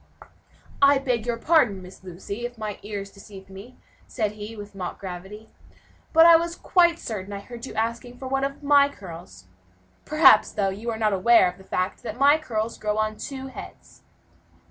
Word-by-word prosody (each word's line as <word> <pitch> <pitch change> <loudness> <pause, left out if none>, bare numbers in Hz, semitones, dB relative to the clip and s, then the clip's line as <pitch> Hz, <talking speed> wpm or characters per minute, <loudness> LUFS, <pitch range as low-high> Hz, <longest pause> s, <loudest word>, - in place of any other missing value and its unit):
"I 280 0 +6
beg 245 -4 -2
your 235 -1 -1
pardon, 230 - +2
Miss 180 +1 -14
Lucy, 190 +5 -7
if 240 0 -5
my 215 -2 -5
ears 200 -1 -6
deceived 195 -1 -14
me," 200 +7 -12 0.3
said 215 -4 -2
he, 210 +1 -9
with 205 -1 -10
mock 185 -2 -6
gravity, 195 +3 -8 0.6
"but 325 0 +7
I 335 -1 +9
was 340 +1 -3
quite 345 -2 +3
certain 205 - -6
I 200 - -5
heard 240 +4 -9
you - - -10
asking 230 +2 -3
for 260 - -7
one 270 +1 -1
of 275 +1 -4
my 285 0 +5
curls. 165 - -12 0.6
Perhaps, 305 -8 +5
though, 200 -2 0
you 210 +5 -5
are 225 - -3
not 215 -2 +1
aware 195 +1 +5
of 180 +1 -6
the - - -14
fact 185 0 -3
that 220 - -6
my 285 +3 +5
curls 230 -6 -4
grow 210 0 -2
on 215 0 0
two 265 +3 -7
heads." - - -12
220 Hz, 190 wpm, -24 LUFS, 200-265 Hz, 0.6 s, I